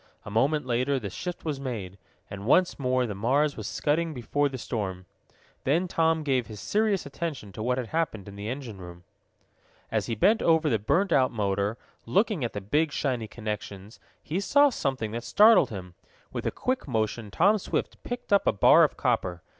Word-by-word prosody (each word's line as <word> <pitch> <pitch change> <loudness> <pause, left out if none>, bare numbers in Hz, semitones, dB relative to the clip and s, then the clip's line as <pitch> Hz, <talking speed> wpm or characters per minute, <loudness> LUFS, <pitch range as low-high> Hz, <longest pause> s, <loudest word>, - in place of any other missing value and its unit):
A 105 - -7
moment 135 +7 +1
later 130 +3 +1
the 100 -5 -6
shift 180 - -6
was 150 -4 -2
made, 105 -8 -5 0.3
and 100 +1 -8
once 180 +5 +3
more 130 -1 +1
the 110 - -4
Mars 135 +9 +1
was 110 -3 -6
scudding 160 +1 -1
before 145 +4 0
the 130 - -6
storm. 95 -6 -4 0.6
Then 165 +7 +1
Tom 160 -2 +1
gave 130 -4 0
his 105 -3 -9
serious 210 - 0
attention 140 -7 -5
to 110 - -8
what 125 +3 0
had 125 -3 -4
happened 155 - -2
in 100 - -9
the 100 +2 -5
engine 125 -6 -6
room. 85 -1 -11 0.9
As - - 0
he 115 - -2
bent 215 - +3
over 160 -2 +3
the 110 - +2
burned 170 - +1
out 130 -2 +4
motor, 100 0 -1 0.3
looking 200 - +1
at 120 - -2
the 105 - -4
big 150 +10 +1
shiny 125 -6 -2
connections, 105 -2 -6 0.2
he 165 +5 -2
saw 285 +8 +4
something 130 - -2
that 115 +1 -4
startled 215 - +6
him. 90 -4 -8 0.4
With - - -3
a - - 0
quick 255 -6 -2
motion 110 -2 -2
Tom 200 - +3
Swift - - -3
picked 245 -4 -4
up 200 - +3
a - - +6
bar 100 - +6
of - - +1
copper. 90 -2 -1
130 Hz, 195 wpm, -27 LUFS, 105-160 Hz, 0.9 s, startled